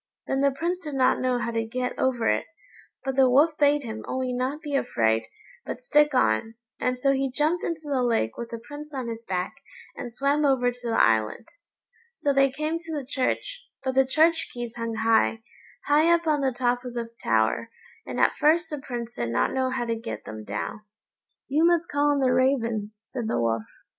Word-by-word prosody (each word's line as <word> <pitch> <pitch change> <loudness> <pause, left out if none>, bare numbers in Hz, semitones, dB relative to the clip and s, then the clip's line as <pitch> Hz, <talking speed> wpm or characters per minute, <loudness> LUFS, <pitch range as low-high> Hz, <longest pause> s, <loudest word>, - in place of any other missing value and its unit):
Then 270 0 0
the 280 - +5
Prince 340 +6 -2
did 300 -4 -6
not 260 -1 +3
know 255 -1 +1
how 235 -1 -2
to 225 -1 0
get 250 +3 -3
over 245 -3 +1
it, - - +1 0.6
but 270 -1 -1
the 265 -1 +5
Wolf 295 +5 +4
bade 290 0 +4
him 220 -2 -6
only 255 -1 -2
not 255 +4 -2
be 290 -2 -3
afraid, 110 - +1 0.4
but - - -5
stick 295 - +3
on, 165 - +2 0.2
and 250 0 0
so 275 +2 +2
he 270 0 0
jumped 305 +6 0
into 335 -2 -2
the 280 -3 0
lake 230 - +1
with 235 -1 -6
the 230 - -5
Prince 290 +5 -10
on 255 -3 -3
his 230 0 -6
back, 180 -1 -2 0.4
and 240 - -6
swam 280 +5 +1
over 260 -3 +3
to 245 0 -9
the 225 - +1
island. 110 - +2 0.7
So 285 -9 0
they 275 0 +4
came 305 +4 -2
to 330 -1 -9
the 290 -4 -3
church; 480 - -2 0.2
but 260 -1 -1
the 265 0 +5
church 320 +5 +2
keys 240 -1 -6
hung 230 -1 -3
high, 225 0 +2 0.4
high 305 +3 +4
up 340 0 +3
on 300 -2 +2
the 265 -1 +2
top 245 0 0
of 245 -1 -7
the 235 -1 -3 0.2
tower, 110 - +1 0.3
and - - -5
at - - +4
first 320 +3 +3
the 300 - -3
Prince 240 -3 -6
did 120 - -3
not 115 - +1
know 260 -1 +1
how 255 -2 -2
to 230 - -1
get 230 +1 -6
them 110 0 -7
down. 105 - -4 0.7
"You 300 +4 +2
must 340 0 +3
call 290 0 +2
on 285 -1 +2
the 255 -1 +3
raven," 230 -5 +1
said 235 0 -5
the - - 0
Wolf. 115 -1 0
255 Hz, 210 wpm, -26 LUFS, 230-290 Hz, 0.7 s, the